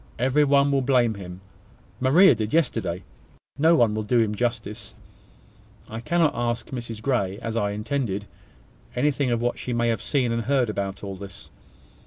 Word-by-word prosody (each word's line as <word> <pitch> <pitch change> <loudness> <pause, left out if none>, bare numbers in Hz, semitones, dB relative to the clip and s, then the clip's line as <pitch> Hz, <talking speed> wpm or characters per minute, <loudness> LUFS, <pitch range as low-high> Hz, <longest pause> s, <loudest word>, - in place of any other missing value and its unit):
Every 130 +5 +3
one 140 0 +3
will 135 -1 +2
blame 125 -3 +2
him: 90 -2 -9 0.6
Maria 160 +10 +6
did 110 +3 -2
yesterday. 95 - 0 0.6
No 165 +3 +5
one 115 -8 +3
will 110 - -1
do 120 +3 +1
him 110 -2 +1
justice. 110 -2 -3 1.0
I 110 - -4
cannot 165 +5 +1
ask 120 0 -2
Mrs 115 -4 -6
Grey, 100 -8 0
as 115 -1 -4
I 105 -3 +1
intended, 105 -1 -2 0.7
anything 140 +1 +1
of 120 -1 0
what 120 - -1
she 125 - -4
may 120 0 +1
have 115 -3 -1
seen 130 -5 0
and 115 0 0
heard 130 -4 +2
about 100 -1 -4
all 100 -1 -5
this. 100 0 -10
120 Hz, 170 wpm, -24 LUFS, 105-135 Hz, 1.0 s, Maria